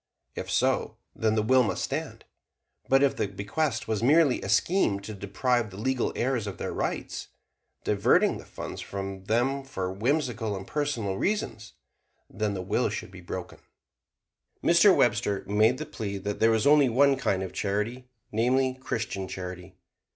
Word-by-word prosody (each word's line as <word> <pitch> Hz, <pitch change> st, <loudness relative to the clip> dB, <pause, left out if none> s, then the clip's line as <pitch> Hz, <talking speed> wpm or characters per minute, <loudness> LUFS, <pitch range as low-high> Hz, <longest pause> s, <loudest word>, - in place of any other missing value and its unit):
If -, -, -6 dB
so, -, -, +1 dB, 0.2 s
then 110 Hz, -1 st, +1 dB
the 110 Hz, -, +2 dB
will 130 Hz, +4 st, +5 dB
must 110 Hz, -, -1 dB
stand. -, -, -4 dB, 0.6 s
But 135 Hz, +1 st, +5 dB
if 140 Hz, -, +3 dB
the -, -, -1 dB
bequest 105 Hz, +6 st, -2 dB
were 110 Hz, -, 0 dB
merely 145 Hz, 0 st, +4 dB
a 95 Hz, -, -5 dB
scheme 105 Hz, -, +2 dB
to 110 Hz, +2 st, -7 dB
deprive 115 Hz, +4 st, 0 dB
the 95 Hz, -, -11 dB
legal 130 Hz, +3 st, 0 dB
heirs 120 Hz, -4 st, 0 dB
of 95 Hz, -4 st, -5 dB
their -, -, -4 dB
rights -, -, -3 dB, 0.6 s
diverting -, -, +3 dB
the -, -, -11 dB
funds -, -, -7 dB
from 95 Hz, -1 st, -6 dB
them 125 Hz, +6 st, +1 dB
for 95 Hz, -8 st, -4 dB
whimsical 115 Hz, -1 st, -1 dB
and 95 Hz, -, -7 dB
personal 120 Hz, -10 st, -2 dB
reasons 120 Hz, -, -2 dB, 0.6 s
then 105 Hz, -1 st, -1 dB
the 95 Hz, -, -4 dB
will 95 Hz, -, +1 dB
should -, -, -5 dB
be -, -, -11 dB
broken. -, -, -7 dB, 1.0 s
Mr. 180 Hz, +3 st, +6 dB
Webster 110 Hz, -4 st, +2 dB
made 110 Hz, +5 st, +3 dB
the 155 Hz, -, -5 dB
plea 105 Hz, -9 st, -5 dB
that 100 Hz, +1 st, -4 dB
there 115 Hz, -, +5 dB
was 110 Hz, -1 st, +2 dB
only 145 Hz, -2 st, +6 dB
one 135 Hz, +4 st, +4 dB
kind 110 Hz, -8 st, 0 dB
of 95 Hz, -, -6 dB
charity, 105 Hz, +5 st, -2 dB, 0.2 s
namely, 130 Hz, +4 st, +2 dB
Christian 110 Hz, -6 st, -3 dB
charity. 90 Hz, 0 st, -7 dB
110 Hz, 165 wpm, -27 LUFS, 100-130 Hz, 1.0 s, Mr